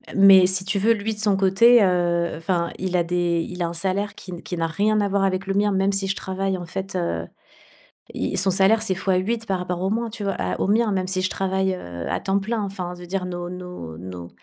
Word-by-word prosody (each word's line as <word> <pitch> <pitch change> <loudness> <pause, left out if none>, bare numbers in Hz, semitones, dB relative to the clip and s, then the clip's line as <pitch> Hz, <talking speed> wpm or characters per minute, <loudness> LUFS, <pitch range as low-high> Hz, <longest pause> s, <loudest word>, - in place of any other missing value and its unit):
mais 195 -1 +8
si 190 0 +3
tu 200 +1 +1
veux 230 +3 +4
lui 215 +1 -3
de - - -10
son 210 -2 +3
côté, 210 +5 +5
heu, 175 -2 +1
enfin 170 0 -1
il 185 0 -2
a 170 - +2
des 170 -1 0
il 180 0 -7
a 170 - 0
un 170 - -5
salaire 195 +4 -1
qui 185 - -11
n 175 - -7
qui 180 - -5
n'a 165 0 0
rien 210 +6 +1
à 200 - 0
voir 195 0 +1
avec 190 0 -1
le 195 - -1
mien. 205 +1 +2
Même 195 0 +1
si 195 0 0
je 195 - -1
travaille 190 0 -2
en 175 - -7
fait, 190 +2 -5
heu, 85 - -2 0.9
il - - -2
son 195 - +3
salaire 195 +4 +4
c'est 195 -4 +2
x8 195 +4 -1
par 190 -3 -1
rapport 180 0 -4
au 190 - 0
mois, 230 +2 -1
tu 210 - -7
vois? 195 - -1
À 90 0 -3
au - - 0
mien, 220 0 +2
même 185 -1 -1
si 185 0 0
je 185 - 0
travaille, 190 0 -1
heu, 85 - -7
à - - -2
temps 195 0 0
plein. 215 +2 -2
Enfin 185 -3 -5
de 175 0 -11
dire 185 0 -3
nos 175 -1 -5
nos 180 - -8
nos 90 -1 -8
190 Hz, 260 wpm, -23 LUFS, 175-200 Hz, 0.9 s, mais